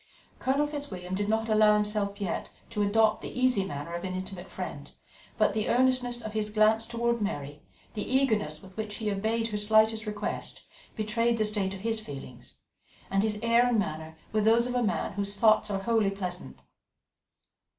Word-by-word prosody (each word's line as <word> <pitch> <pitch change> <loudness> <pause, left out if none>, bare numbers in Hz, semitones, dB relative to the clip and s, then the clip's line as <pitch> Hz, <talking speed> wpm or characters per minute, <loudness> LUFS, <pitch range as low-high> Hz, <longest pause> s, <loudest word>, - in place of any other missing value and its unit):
Colonel 275 +3 +2
Fitzwilliam 210 -12 -6
did 205 +2 -1
not 225 +1 +1
allow 215 -1 +5
himself 210 -1 -1
yet 200 -3 -3 0.2
to 210 -2 -1
adopt 215 +1 +3
the - - -6
easy 255 -6 +3
manner 165 -2 -5
of 170 - -4
an 185 -1 -3
intimate 185 0 -6
friend, 145 -6 -6 0.5
but 215 -2 +3
the 215 0 -1
earnestness 245 -1 +2
of 215 -1 -6
his 215 -1 +1
glance 220 +1 +3
towards 235 0 0
Mary, 145 -8 -4 0.3
the 210 - -4
eagerness 215 - +1
with 190 0 -14
which 215 -1 -4
he 215 -1 -2
obeyed 225 +3 -1
her 210 - -2
slightest 215 +1 +3
request, 210 -1 -4 0.3
betrayed 230 +2 +1
the 215 - +2
state 200 -2 -1
of 190 - -9
his 225 +1 -1
feelings, 130 - -10 0.6
and 195 0 +3
his 210 0 0
air 235 +1 +4
and 245 -2 +2
manner 160 -4 -3 0.2
were 215 - +2
those 225 +2 +4
of 250 - -2
a 250 - +1
man 215 -3 -1
whose 200 +1 -2
thoughts 215 0 +4
are 195 -1 -2
wholly 225 -2 +2
pleasant. 185 -2 -5
215 Hz, 180 wpm, -28 LUFS, 195-225 Hz, 0.6 s, allow